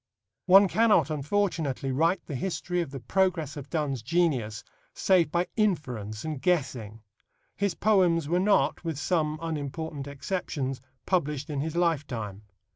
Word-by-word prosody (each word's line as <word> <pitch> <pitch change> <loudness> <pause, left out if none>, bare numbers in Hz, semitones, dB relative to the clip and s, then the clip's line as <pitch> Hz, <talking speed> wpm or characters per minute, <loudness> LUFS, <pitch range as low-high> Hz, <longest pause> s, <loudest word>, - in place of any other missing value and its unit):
One 195 +2 +8
cannot, 220 -4 +3
unfortunately, 150 -3 -1
write 165 +6 +1
the - - -6
history 180 +4 -2
of 170 - -4
the 135 0 -7
progress 165 - 0
of 145 -2 -8
Donne's 145 -6 -1
genius 125 -7 0 0.3
save 180 -5 +3
by 175 +1 +1
inference 125 - -1
and 155 -4 -4
guessing. 125 - -1 0.5
His 200 -4 -1
poems 180 -7 +3
were 175 +3 +2
not, 185 -8 +2
with 165 -4 -3
some 155 0 0
unimportant 150 -2 -4
exceptions, 140 -3 -3 0.2
published 150 -4 -1
in 140 -2 -1
his 160 +2 -3
lifetime. 135 - -1
155 Hz, 135 wpm, -27 LUFS, 135-180 Hz, 0.5 s, One